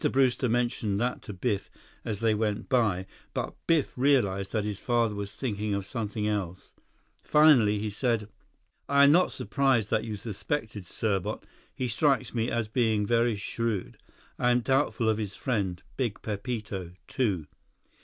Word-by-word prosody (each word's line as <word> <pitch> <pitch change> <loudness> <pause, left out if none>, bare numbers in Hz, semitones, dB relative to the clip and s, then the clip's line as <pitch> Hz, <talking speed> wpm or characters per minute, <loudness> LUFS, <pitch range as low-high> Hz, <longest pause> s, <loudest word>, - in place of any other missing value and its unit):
Brewster 130 -1 +2
mentioned 115 -4 0
that 125 +2 -1
to 105 - -8
Biff 100 +1 -2 0.3
as 105 -2 -4
they 115 -1 +3
went 105 -1 -1
by; 110 -8 +2 0.3
but - - -2
Biff 160 -4 +2
realized 110 -8 +2
that 110 -2 0
his 105 -2 -3
father 120 -3 +1
was 100 -1 -5
thinking 105 -5 -2
of 100 -1 -3
something 105 0 -3
else. 95 -4 -3 0.5
Finally, 135 -9 +5
he 105 +1 -3
said: 115 -1 0 0.6
"I 140 0 +6
am 140 - +8
not 180 +4 +4
surprised 135 -7 +1
that - - +2
you 110 -2 -4
suspected 110 - -4
Serbot. 100 -3 -2 0.3
He 130 - -2
strikes 135 +3 +1
me 115 -1 0
as 115 -2 -1
being 110 -3 +1
very 115 +1 +2
shrewd. 105 -1 -3 0.4
I 125 - +3
am 125 0 +3
doubtful 135 -2 +1
of 110 -1 +2
his 100 -3 -4
friend, 100 -9 -2
Big 120 -6 -2
Pepito, 105 -5 -4
too." 100 - 0
110 Hz, 155 wpm, -28 LUFS, 100-125 Hz, 0.6 s, am